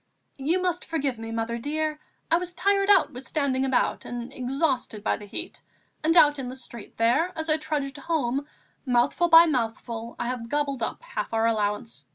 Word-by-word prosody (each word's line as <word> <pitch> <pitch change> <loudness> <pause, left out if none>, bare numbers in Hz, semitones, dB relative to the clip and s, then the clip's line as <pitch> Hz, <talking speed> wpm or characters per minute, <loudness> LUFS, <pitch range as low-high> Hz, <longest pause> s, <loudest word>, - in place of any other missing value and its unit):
"You 320 +7 +1
must 365 -2 -1
forgive 280 -7 -2
me, 225 0 -6
mother 230 +1 -2
dear; 305 +3 -2 0.3
I 335 - +6
was 355 0 -4
tired 400 0 +2
out 395 -5 +5
with 250 +2 -8
standing 275 -4 0
about 265 -2 +1
and 245 +2 -6
exhausted 260 -4 -1
by - - +1
the 205 - -10
heat, 335 - -5 0.4
and 325 +2 +3
out 295 -3 +6
in 260 - -4
the 255 - -6
street 240 -4 -11
there 250 +10 +2
as 320 0 -1
I 310 - +3
trudged 290 -3 -3
home, 280 -2 -1 0.4
mouthful 255 +7 +2
by 330 +1 +9
mouthful 230 -4 -2
I - - -3
have 240 -1 -4
gobbled 285 -3 -1
up 225 - -3
half - - -4
of - - -15
our 225 0 +2
allowance. 210 -5 -1
270 Hz, 195 wpm, -26 LUFS, 235-315 Hz, 0.4 s, by